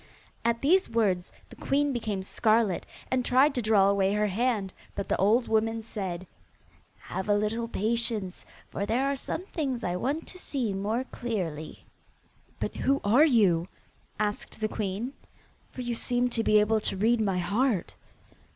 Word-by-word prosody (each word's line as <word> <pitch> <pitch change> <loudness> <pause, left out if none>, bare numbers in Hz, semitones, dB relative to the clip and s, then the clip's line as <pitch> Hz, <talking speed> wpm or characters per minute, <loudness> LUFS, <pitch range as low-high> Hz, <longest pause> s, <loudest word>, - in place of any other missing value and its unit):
At 235 +1 0
these 370 +7 +4
words 200 -6 +1 0.2
the - - -10
queen 285 0 +1
became 215 -5 -2
scarlet, 215 -1 +1 0.2
and 260 -1 +2
tried 265 +4 +4
to 250 - -1
draw 210 -3 +4
away 200 0 +2
her 210 0 +2
hand, 210 -1 0 0.2
but 200 - -3
the - - +1
old 220 +6 +3
woman 225 0 +1
said: 190 -5 -4 0.7
'Have 190 +2 -5
a 205 - +5
little 215 +3 -1
patience, 220 -3 -1 0.3
for - - -3
there 245 +5 +1
are - - -1
some 320 +6 -4
things 270 - -3
I 175 0 -1
want 280 - -2
to 365 - -9
see 250 - -2
more 210 +6 -1
clearly.' 175 -10 -4 0.7
'But - - -3
who 275 +1 +2
are 240 +10 +6
you?' 195 - +3 0.5
asked 210 0 -2
the 215 - 0
queen, 215 +4 -3 0.6
'for 255 - -7
you 240 -1 -2
seem 245 +1 0
to 230 -1 -1
be 215 -1 +5
able 215 +1 +3
to 200 - -2
read 225 +3 +3
my 195 -4 +1
heart. 200 +3 0
220 Hz, 165 wpm, -28 LUFS, 200-245 Hz, 0.7 s, are